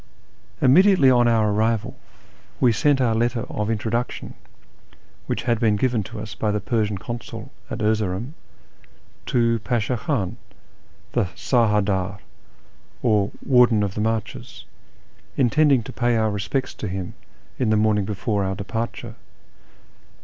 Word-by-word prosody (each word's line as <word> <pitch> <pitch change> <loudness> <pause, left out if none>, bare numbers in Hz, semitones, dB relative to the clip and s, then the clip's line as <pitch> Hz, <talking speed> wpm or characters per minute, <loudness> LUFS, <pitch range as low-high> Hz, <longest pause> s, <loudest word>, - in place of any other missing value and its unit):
Immediately 165 0 +6
on 120 -1 +4
our 110 -2 +3
arrival 110 +1 0 0.6
we 125 - +4
sent 135 +6 +2
our 120 -3 +2
letter 120 +1 0
of 105 0 -2
introduc 115 +2 -1
tion, - - -8 0.9
which - - -2
had 120 -3 +1
been 110 -3 +3
given 120 +1 +1
to 105 +3 -8
us 105 0 -7
by 110 - -2
the 105 0 0
Persian 105 -1 -1
Consul 120 +3 -7 0.2
at 110 -1 -4
Erzeroum, 110 +3 -1 0.9
to 115 -1 +2
Pasha 120 +1 -1
Khan, 115 - -2 0.7
the - - +1
sar 120 -4 +2
hadd 105 -1 +2
ddr, 95 -1 -1 0.9
or 105 -4 +2 0.2
Warden 125 -5 +5
of 100 -2 -2
the 105 - -3
Marches, 110 -1 -3 0.7
intending 140 0 +3
to - - -9
pay 120 -1 +1
our 110 -1 +1
respects 100 +7 -2
to 105 - -6
him 95 -1 -5 0.5
in 125 -4 +1
the 110 - +3
morning 105 -1 +2
before 105 0 -1
our 95 0 -2
departure. 115 +4 -5
110 Hz, 140 wpm, -23 LUFS, 105-120 Hz, 0.9 s, Immediately